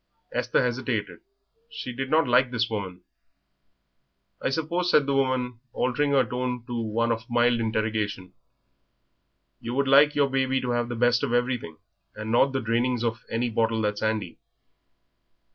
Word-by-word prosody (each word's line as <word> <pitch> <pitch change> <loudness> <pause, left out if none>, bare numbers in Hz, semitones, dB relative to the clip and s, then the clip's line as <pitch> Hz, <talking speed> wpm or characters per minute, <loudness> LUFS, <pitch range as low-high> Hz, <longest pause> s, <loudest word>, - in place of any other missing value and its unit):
Esther - - +1
hesitated; - - -2 0.5
she 130 - -6
did 130 +2 -4
not 155 -1 +3
like 125 +1 +4
this 115 -2 0
woman. 95 -4 -4 1.4
"I - - 0
suppose," 165 +5 -1
said 150 -5 +4
the 140 - 0
woman, 130 -3 0
altering 135 +3 0
her 135 -2 +4
tone 125 +1 -3
to 120 - -7
one 115 0 0
of 115 +2 -3
mild 120 0 +3
interrogation, 110 -4 -2 1.3
"you 120 +2 -5
would 140 0 +1
like 145 +2 +6
your 145 -1 +3
baby 135 0 +1
to 125 - -2
have 120 0 -1
the 120 - -3
best 120 +1 +3
of - - -1
everything, 120 -10 -1 0.4
and 110 +1 -5
not 120 +4 +4
the 135 0 -1
drainings 120 +1 0
of 115 -1 -2
any 115 +1 -1
bottle 115 0 0
that's 105 0 -1
handy?" 110 -5 -2
120 Hz, 160 wpm, -26 LUFS, 115-130 Hz, 1.4 s, like